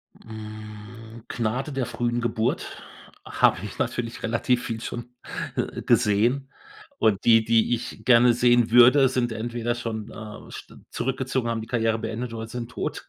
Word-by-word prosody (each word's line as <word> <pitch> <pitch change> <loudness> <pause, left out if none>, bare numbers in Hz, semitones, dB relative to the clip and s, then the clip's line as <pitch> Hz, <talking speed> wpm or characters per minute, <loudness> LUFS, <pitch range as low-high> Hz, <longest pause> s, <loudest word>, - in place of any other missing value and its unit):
Mm, 110 +1 -10
„Gnade 125 +5 -2
der 135 -2 -1
frühen 120 0 -2
Geburt” 115 0 -2 0.4
habe - - +3
ich - - -7
natürlich 115 0 -3
relativ 120 +2 +1
viel 115 -1 -3
schon, 120 +1 -7 0.4
äh, - - -3
gesehen. 120 +7 +2 0.5
Und 105 -3 +2
die, 115 -1 +6
die 115 +1 +3
ich 120 +1 -8
gerne 120 -1 +6
sehen 120 -1 +3
würde, 125 +3 +7
sind 125 -2 0
entweder 120 +1 -2
schon, 115 -3 -5
äh, 110 -1 -10
sch - - -10 0.2
zurückgezogen, 130 -1 -2
haben 115 -1 -2
die 110 - -8
Karriere 115 -2 0
beendet 115 +2 -4
oder 110 0 -5
sind 120 0 -6
tot. - - -4
115 Hz, 150 wpm, -25 LUFS, 110-125 Hz, 0.5 s, würde